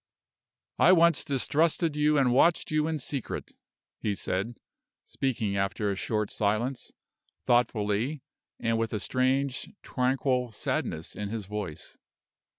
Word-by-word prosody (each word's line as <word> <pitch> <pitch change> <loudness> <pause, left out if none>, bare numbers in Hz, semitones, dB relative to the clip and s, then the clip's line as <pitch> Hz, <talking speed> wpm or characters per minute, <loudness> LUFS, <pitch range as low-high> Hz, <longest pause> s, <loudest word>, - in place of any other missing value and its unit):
"I 185 - +7
once 170 -1 +5
distrusted 155 +3 +1
you 150 0 +3
and 130 -3 +3
watched 165 +6 +3
you 155 0 +2
in 160 -1 -1
secret," 140 -2 -5 0.5
he 105 -2 -1
said, 100 +5 -2 0.5
speaking 110 -7 -2
after 100 +1 0
a - - -2
short 105 +1 -1
silence, 110 +5 -1 0.5
thoughtfully, 120 +3 +1 0.4
and 115 0 0
with 115 0 -1
a 105 - -1
strange, 130 +4 0
tranquil 125 -2 0
sadness 80 -5 -2
in 105 -1 -4
his 110 -2 -4
voice. 100 -6 -6
125 Hz, 125 wpm, -28 LUFS, 105-140 Hz, 0.5 s, I